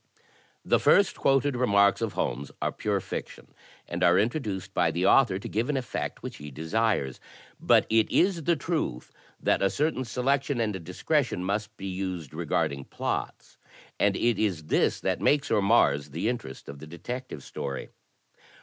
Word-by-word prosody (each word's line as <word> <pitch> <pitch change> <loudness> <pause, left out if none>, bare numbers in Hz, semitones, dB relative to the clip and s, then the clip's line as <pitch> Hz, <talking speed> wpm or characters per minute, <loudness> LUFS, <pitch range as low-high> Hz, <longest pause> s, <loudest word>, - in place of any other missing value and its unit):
The - - +3
first 200 -1 +4
quoted 135 0 +2
remarks 100 -5 +3
of 115 -2 -1
Holmes 65 +3 -2
are - - 0
pure - - -1
fiction - - -7 0.3
and 85 +1 -3
are 90 0 +5
introduced 105 - -1
by - - +2
the 90 +2 -1
author 105 -4 +5
to 100 - -7
give 115 +5 -1
an 145 - +1
effect 130 - -4
which - - -6
he 75 0 -8
desires. 80 - -1 0.4
But - - +4
it 110 0 +3
is 175 -4 +2
the 170 - +3
truth 155 - -3 0.3
that - - +1
a 100 - +3
certain 150 0 0
selection 135 +2 0
and 105 -6 -1
dis 90 +2 -10
cretion 145 - +1
must 105 +3 -3
be 95 - -7
used 95 -5 -4
regarding 70 -1 -1
plots, - - -4 0.4
and - - +3
it 120 -1 +1
is 95 -7 0
this 75 - +1
that - - -1
makes 145 -1 +2
or 110 -2 +3
mars 75 -9 +3
the 85 +10 -1
interest 90 - -6
of 70 - -8
the 80 - -10
Detective 85 - -7
Story. 70 -1 -5
105 Hz, 170 wpm, -27 LUFS, 85-130 Hz, 0.4 s, are